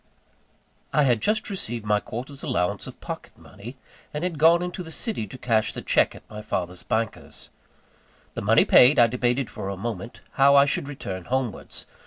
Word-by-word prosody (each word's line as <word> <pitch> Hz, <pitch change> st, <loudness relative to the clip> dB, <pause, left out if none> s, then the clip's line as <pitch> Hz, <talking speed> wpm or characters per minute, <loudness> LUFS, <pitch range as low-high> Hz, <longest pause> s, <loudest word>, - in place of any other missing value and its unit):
I 150 Hz, -, +3 dB
had 120 Hz, -5 st, +2 dB
just 215 Hz, +1 st, +1 dB
received 120 Hz, -, -5 dB
my 105 Hz, 0 st, +2 dB
quarter's 130 Hz, +6 st, -7 dB
allowance 125 Hz, -, -1 dB
of -, -, -11 dB
pocket -, -, -8 dB
money, 115 Hz, +6 st, -12 dB, 0.3 s
and 150 Hz, +2 st, -4 dB
had 175 Hz, -4 st, -3 dB
gone 170 Hz, +3 st, +5 dB
into 180 Hz, +1 st, -5 dB
the 165 Hz, -2 st, -9 dB
city 200 Hz, -, -3 dB
to 130 Hz, -, -10 dB
cash 110 Hz, -3 st, 0 dB
the -, -, -6 dB
cheque -, -, +2 dB
at -, -, -15 dB
my 105 Hz, 0 st, -8 dB
father's 90 Hz, -3 st, -4 dB
bankers. 110 Hz, 0 st, -4 dB, 0.8 s
The -, -, -4 dB
money 110 Hz, +3 st, +4 dB
paid, 130 Hz, +4 st, +7 dB
I 120 Hz, -, +7 dB
debated 125 Hz, +2 st, 0 dB
for 95 Hz, -, -6 dB
a 100 Hz, -, -4 dB
moment 115 Hz, +1 st, -6 dB
how 140 Hz, 0 st, +5 dB
I 140 Hz, 0 st, +7 dB
should 140 Hz, 0 st, -1 dB
return 95 Hz, -11 st, -6 dB
homewards. 130 Hz, -2 st, -3 dB
125 Hz, 185 wpm, -25 LUFS, 105-145 Hz, 0.8 s, paid